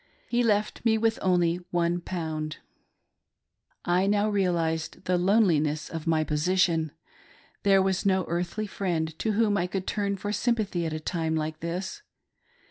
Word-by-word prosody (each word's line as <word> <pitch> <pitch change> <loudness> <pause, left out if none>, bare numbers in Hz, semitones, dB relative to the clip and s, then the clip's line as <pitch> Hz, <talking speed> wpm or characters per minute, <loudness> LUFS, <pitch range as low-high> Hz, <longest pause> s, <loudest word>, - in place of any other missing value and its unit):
He 240 0 +1
left 210 -2 +1
me 225 -2 +3
with 225 +1 +1
only 175 -2 +2
£i. 170 -3 -2 1.3
I 180 +2 +2
now 205 +1 +2
realised 170 -5 -1
the 180 - +2
loneliness 170 -6 +2
of 165 -1 -5
my 160 -1 +3
position, 160 +1 +1 0.4
— - - -29
there 195 -1 +4
was 190 -1 0
no 190 -2 +2
earthly 175 +5 -2
friend 170 -6 -2
to 220 - 0
whom 210 -1 +2
I 180 - 0
could 190 0 -3
turn 200 -1 -1
for 205 +2 -3
sympathy 210 -6 0
at 160 - -4
a 155 - -3
time 160 0 -1
like 155 0 -2
this. 180 - -4
180 Hz, 150 wpm, -27 LUFS, 160-200 Hz, 1.3 s, there